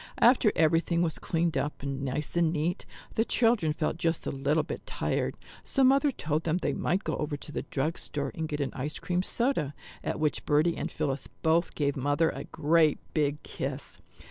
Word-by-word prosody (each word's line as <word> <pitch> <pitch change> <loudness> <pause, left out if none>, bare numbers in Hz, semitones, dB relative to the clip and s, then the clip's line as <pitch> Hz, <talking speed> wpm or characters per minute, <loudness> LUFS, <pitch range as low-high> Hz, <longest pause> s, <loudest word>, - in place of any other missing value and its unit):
After 235 -3 +6
everything 165 +2 +3
was 160 -3 -1
cleaned 165 -1 0
up 145 -1 -2
nice 140 +2 -2
and 170 -2 +3
neat, 170 +3 -1 0.3
the 225 - +2
children 225 -9 +3
felt 155 +1 -1
just 165 -1 0
a - - -1
little 145 +3 +1
bit - - -6
tired, - - -1 0.3
so 270 - +1
Mother 275 +3 +5
told 155 - -1
them 165 +1 +1
they 150 -5 -1
might 185 +9 0
go - - -1
over 150 -1 -2
to 150 - -9
the - - -2
drug 150 +5 -1
store 145 -1 -3
and 160 -1 -3
get 150 -1 -2
an 135 - -1
ice 145 +3 -3
cream 180 0 0
soda, 210 - 0 0.3
at - - -2
which 155 -1 0
Bertie 155 +3 +3
and - - -3
Phillis 135 -1 -2 0.2
both 165 +2 +2
gave 140 -2 0
Mother 145 +4 +2
a - - -6
great 155 0 +3 0.2
big 150 -1 0
kiss. 135 -9 -5
155 Hz, 195 wpm, -29 LUFS, 145-170 Hz, 0.3 s, After